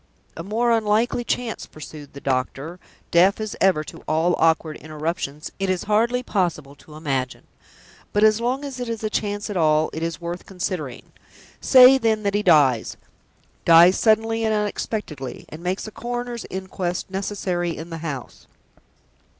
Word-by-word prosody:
"A - - -6
more 225 +6 0
unlikely 225 +2 +1
chance," 235 -1 -3
pursued 150 -2 -11
the 140 - -9
doctor, 135 +6 -2 0.3
deaf 185 +5 +4
as 215 -1 -4
ever 185 -5 +3
to - - -10
all 160 +3 +2
awkward 160 -1 +2
interruptions, 155 -1 -4
"it 195 -1 -1
is 185 -1 0
hardly 235 +4 +1
possible 170 - -1
to 150 - -15
imagine! 135 -5 -3 0.7
But 205 - +2
as 215 +1 +4
long 255 +4 -1
as 270 -3 -7
it 245 -1 -4
is 225 -1 -4
a 215 - -1
chance 205 -1 -2
at 200 - -3
all, 155 -1 +3
it 160 - -5
is 165 0 -3
worth 175 +1 -6
considering. 175 -9 -5 0.5
Say, 260 0 +7
then, 220 -3 +1
that 200 -1 0
he 205 - +1
dies 145 - +3 0.7
dies 170 +3 +7
suddenly 225 0 +2
and 220 -1 +1
unexpectedly, 205 - -4
and 155 - -9
makes 180 +2 -2
a 215 - -7
Coroner's 240 +1 -5
Inquest 185 -1 -4
necessary 185 -3 -2
in 165 +2 -8
the 165 - -5
house. 145 -6 -7
185 Hz, 160 wpm, -23 LUFS, 155-220 Hz, 0.7 s, Say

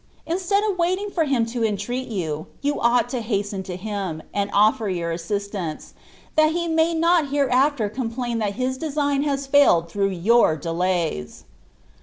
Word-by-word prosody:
Instead 380 +4 0
of 405 -4 -1
waiting 370 +4 0
for 330 -4 +1
him 265 -5 +1
to 230 0 -3
entreat 225 +5 -2
yOQ. 160 -7 -3 0.2
you 290 +1 0
ought 235 0 +3
to 245 -1 -3
haxten 205 -3 -2
to 185 -1 -6
him. 190 -5 -4
and 200 0 -1
offer 215 +2 +3
your 170 -2 -2
assistance, 180 -1 -4 0.4
that 310 0 +4
he 340 0 -1
may 325 0 +2
Hot 335 -1 +4
iiereafler 275 -5 +1
complain 240 -1 -3
that 205 -2 -1
his 260 0 -2
design 285 -2 0
has 280 -1 -1
failed 270 - +4
through 200 +1 +1
your 190 -2 +3
delays." 165 - -2
235 Hz, 160 wpm, -23 LUFS, 195-285 Hz, 0.4 s, that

